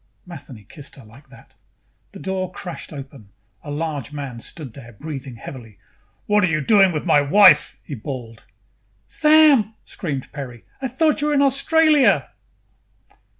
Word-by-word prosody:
Matheny 140 - -11
kissed 140 +7 -12
her 135 - -14
like 130 +6 -18
that. 130 -3 -18 0.6
The - - -11
door 185 -1 -3
crashed 180 -1 -8
open. 135 -7 -11 0.3
A 150 - -9
large 145 -2 -4
man 140 -5 -6
stood 135 0 -8
there, 120 -2 -12
breathing 135 0 -7
heavily. 115 -3 -11 0.5
"What 210 0 +2
are - - +4
you 155 -2 0
doing 195 +4 +4
with 155 -3 -4
my 145 - +4
wife?" 150 +1 +5
he - - -8
bawled. 115 -2 -8 0.6
"Sam!" 300 -8 +4
screamed 140 -7 -5
Peri. 125 -5 -8 0.2
"I 265 - -1
thought 300 +4 +1
you 295 - 0
were 300 - +1
in 280 - +4
Australia!" 295 +2 +3
150 Hz, 150 wpm, -21 LUFS, 135-210 Hz, 0.6 s, wife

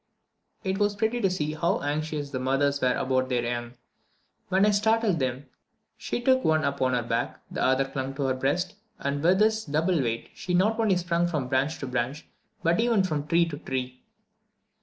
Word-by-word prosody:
It 190 +1 -1
was 205 0 +2
very 220 +2 +1
pretty 240 0 -2
to 195 - +3
see 155 -4 -2
how 170 +2 0
anxious 150 0 -2
the 130 - -2
mothers 140 +2 +1
were 125 -1 +2
about 130 0 0
their 125 -2 0
young. 120 0 -3 0.7
When 190 +2 +4
I 210 - +4
startled 210 -3 +2
them, 130 +1 -2 0.5
she - - -3
took 260 +1 +3
one 155 0 +3
upon 135 -2 0
her 120 - 0
back, 115 - -2
the - - -3
other 130 +1 +3
clung 135 0 -4
to 140 - -2
her 135 -1 +1
breast, 145 +8 -1 0.2
and 140 0 -2
with 180 +4 +4
this 220 +1 +3
double 160 +1 +1
weight 115 -2 -3
she 180 -1 -2
not 215 +5 +2
only 210 -5 +3
sprung 175 -1 +1
from 150 -7 -2
branch 135 +5 +1
to - - -2
branch, 130 +3 -2 0.4
but 170 +1 +2
even 230 -4 +3
from 150 -5 -2
tree 170 +2 +4
to 145 -2 -6
tree. 130 -2 -4
150 Hz, 200 wpm, -27 LUFS, 130-185 Hz, 0.7 s, When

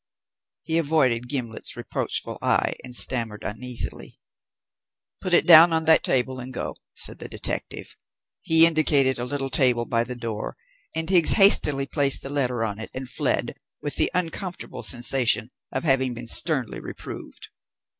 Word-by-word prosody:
He 160 0 0
avoided 135 -7 +1
Gimblet's 120 -5 -4
reproachful - - -3
eye - - +1
and 125 -1 -9
stammered 115 -5 +1
uneasily: 120 +3 -6 1.0
"Put 185 - -5
it 175 - +4
down 170 0 +8
on 160 0 0
that 160 0 +4
table 130 0 -1
and 130 +1 -8
go," - - -5 0.2
said - - -5
the - - -7
detective. - - -5 0.5
He 160 0 +7
indicated 145 -5 +3
a 120 - -3
little 135 +1 -4
table 125 -4 +2
by 115 -1 0
the 125 +1 -7
door, 115 -3 -6 0.4
and 160 0 0
Higgs 175 -3 +5
hastily 150 -9 +4
placed 140 0 +1
the 135 - -6
letter 125 -5 -1
on 105 -1 -4
it 110 - -7
and 130 0 -6
fled, - - -1 0.3
with 145 - -5
the - - +2
uncomfortable 180 +1 -4
sensation 120 -1 +2 0.2
of 130 - -3
having 130 -4 +1
been 120 +1 -8
sternly 130 -1 +1
reproved. - - -9
130 Hz, 155 wpm, -23 LUFS, 120-160 Hz, 1.0 s, down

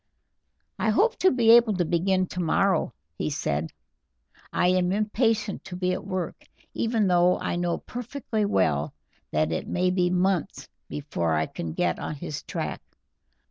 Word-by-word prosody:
"I 220 - +1
hope 425 - +3
to 375 - +5
be 235 -6 +4
able 230 -3 +6
to 175 - +1
begin 185 +3 +1
tomorrow," 180 -1 +1 0.3
he 75 - -1
said. 75 +2 -2 0.8
"I 180 - +2
am 180 0 +2
impatient 215 0 0
to 190 - -7
be 180 0 0
at 185 - -4
work, 185 -2 -4 0.3
even 225 -2 +1
though 180 -1 +4
I - - -2
know 175 -1 0
perfectly 240 -2 -4
well 80 - +1 0.3
that 80 +1 0
it 80 - -3
may 180 0 +1
be 180 -1 +2
months 185 0 0 0.2
before 85 - -2
I 80 0 +1
can 80 +1 -6
get 85 0 0
on 150 - -4
his 145 +1 -6
track. - - -4
180 Hz, 155 wpm, -26 LUFS, 155-210 Hz, 0.8 s, able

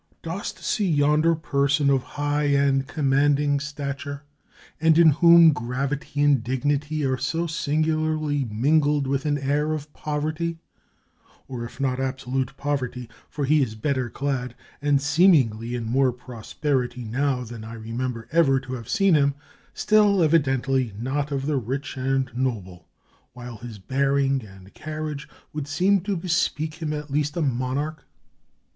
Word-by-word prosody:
"Dost 175 +5 -5
see 205 -4 0
yonder 150 +2 +3
person 140 -2 +1
of 135 -1 +2
high 145 +2 -2
and 140 -1 +2
commanding 145 0 +2
stature, 140 -1 -5 0.6
and 160 0 +4
in 170 -1 +7
whom 170 +1 +7
gravity 135 +4 -3
and 140 -5 +3
dignity 145 +4 -1
are 130 -1 0
so 165 +6 -1
singu 155 -1 0
larly 155 -4 -1
mingled 145 +5 +2
with 135 +2 -1
an 145 -1 +1
air 145 +3 0
of 150 -1 -6
poverty; 155 +3 -3 0.9
or, 125 -3 -5
if 120 - -12
not 130 -2 0
abso 130 -1 -4
lutely 130 -2 0
of - - -36
poverty 130 -4 -3
— - - -31
for 145 -2 -3
he 150 +2 +3
is 110 -5 -1
better 130 +1 -1
clad, 130 -2 -3 0.3
and, 145 -1 +3
seemingly, 140 - +3
in 120 - -3
more 130 +3 +2
prosperity 125 +1 -3
now 130 +3 -1
than 115 -1 -9
I 110 +1 -8
remember 115 +1 -4
ever 150 -5 +4
to 130 -1 -8
have 120 -3 -7
seen 195 -4 +3
him 140 -2 +3 0.2
— - - -33
still, 205 -4 +4
evidently 135 -6 +1
not 140 +5 -2
of 135 -1 -2
the 150 -1 0
rich 135 +4 -4
and 135 0 0
noble; 100 -10 -3 0.5
while 120 -2 -9
his 115 0 -9
bearing 135 +4 0
and 95 -1 -15
carriage 155 -2 -6 0.2
would 150 -2 -4
seem 185 +7 +2
to 200 -3 -1
bespeak 165 -2 -1
him 155 -2 -2
at 150 -1 -5
least 150 +2 -1
a - - 0
monarch?" 135 +4 -2
140 Hz, 155 wpm, -24 LUFS, 130-150 Hz, 0.9 s, in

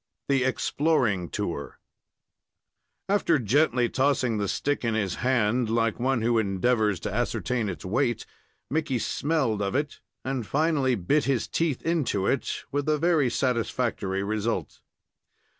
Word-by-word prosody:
THE 135 -2 +3
EXPLORING 130 - +1
TOUR 85 -8 -4 1.3
After 195 -5 +3
gently 125 +1 +2
tossing 130 -4 +1
the 100 - -1
stick 145 +8 -1
in 115 -2 0
his 100 -5 -1
hand, 120 -2 +2
like 115 0 +1
one 130 -2 +1
who 115 0 +3
endeavors 105 0 +1
to 100 - -4
ascertain 120 -1 -1
its 85 -3 -6
weight, 120 +4 0 0.4
Mickey 150 -3 -1
smelled 135 -4 0
of 100 +2 -1
it, 145 +1 -2 0.3
and 130 -2 -2
finally 145 -4 +2
bit 125 - +1
his 135 -4 0
teeth 160 -6 -1
into 150 - 0
it, 135 - -1
with 145 +1 -1
a 155 - +3
very 160 -4 +2
satisfactory 115 -6 -1
result. 105 -4 -2
125 Hz, 135 wpm, -26 LUFS, 105-140 Hz, 1.3 s, THE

